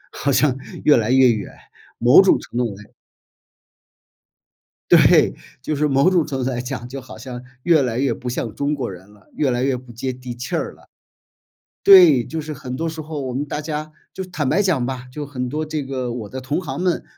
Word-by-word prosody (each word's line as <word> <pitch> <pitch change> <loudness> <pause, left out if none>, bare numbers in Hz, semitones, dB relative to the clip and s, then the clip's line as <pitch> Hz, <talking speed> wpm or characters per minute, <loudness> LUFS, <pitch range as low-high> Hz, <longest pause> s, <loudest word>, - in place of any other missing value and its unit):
好 140 - -1
像 135 -1 +2 0.3
越 150 - +6
来 115 +1 0
越 130 -1 +6
远， 110 -3 -3 0.5
某 125 +10 +7
种 190 - +4
程 - - -11
度 120 -4 -1
来 105 +1 -15 2.0
对， - - +6 0.3
就 155 - -2
是 150 +1 +1
某 140 +5 +3
种 175 -4 +3
程 135 -4 -3
度 - - 0
来 125 -2 -2
讲， 125 -2 -5
就 135 +2 -7
好 130 - -12
像 125 -1 -8 0.2
越 165 -4 +4
来 120 -2 -2
越 130 -3 +1
不 125 - -7
像 115 -3 -4
中 145 +3 -1
国 130 -7 -4
人 95 +2 -12
了， 105 0 -22
越 145 -3 +1
来 120 +1 0
越 135 -2 +1
不 125 -1 -12
接 130 +3 -3
地 125 -1 -8
气 125 +1 -6
儿 - - -2
了。 - - -22 1.0
对， 175 -10 +8
就 160 - -5
是 155 0 -5
很 130 -2 -7
多 165 - -2
时 160 -1 -5
候 155 -1 -6
我 130 -2 -4
们 140 +3 -2
大 150 - -4
家 155 0 -5 0.2
就 190 - -5
坦 160 -7 -3
白 195 - +2
讲 165 -11 +1
吧， 130 -1 -5
就 150 +2 -6
很 125 -3 -4
多 155 +2 -3
这 155 -2 -3
个 130 -3 -4
我 110 -4 -6
的 130 - -6
同 130 +7 -2
行 135 -5 -5
们， 180 -1 0
135 Hz, 235 characters per minute, -21 LUFS, 125-150 Hz, 2.0 s, 对